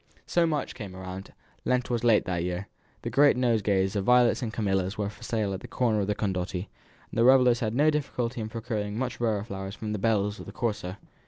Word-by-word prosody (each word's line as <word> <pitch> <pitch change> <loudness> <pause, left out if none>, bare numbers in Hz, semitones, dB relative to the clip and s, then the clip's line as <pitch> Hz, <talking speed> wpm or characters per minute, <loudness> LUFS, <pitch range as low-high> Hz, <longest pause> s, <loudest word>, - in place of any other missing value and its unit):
So 170 -1 +2
March 150 -3 -1
came 100 -6 -8
round; 95 0 -7 0.3
Lent 125 0 0
was 120 -1 0
late 115 -3 +4
that 90 -2 -1
year. 90 +2 -3 0.4
The 115 - -3
great 140 +2 +5
nosegays 105 -5 +2
of 100 - 0
violets 125 +4 +4
and 115 -3 -2
camellias 95 -3 -1
were 105 -1 -2
for - - -18
sale 105 -4 -1
at 95 - -4
the - - -10
corner 115 -4 +1
of 100 - 0
the 105 - 0
Condotti, 95 -2 -2 0.4
and - - -6
the - - +5
revellers 125 -1 +6
had 110 -2 -1
no 150 +4 +4
difficulty 125 -5 -2
in 110 - -4
procuring 110 -2 -3
much 125 0 -3
rarer 110 -4 +1
flowers 95 -2 -6
for 110 - -8
the 105 -1 -2
belles 105 -1 +1
of - - -9
the - - -7
Corso. 105 -6 -2
110 Hz, 225 wpm, -27 LUFS, 100-120 Hz, 0.4 s, revellers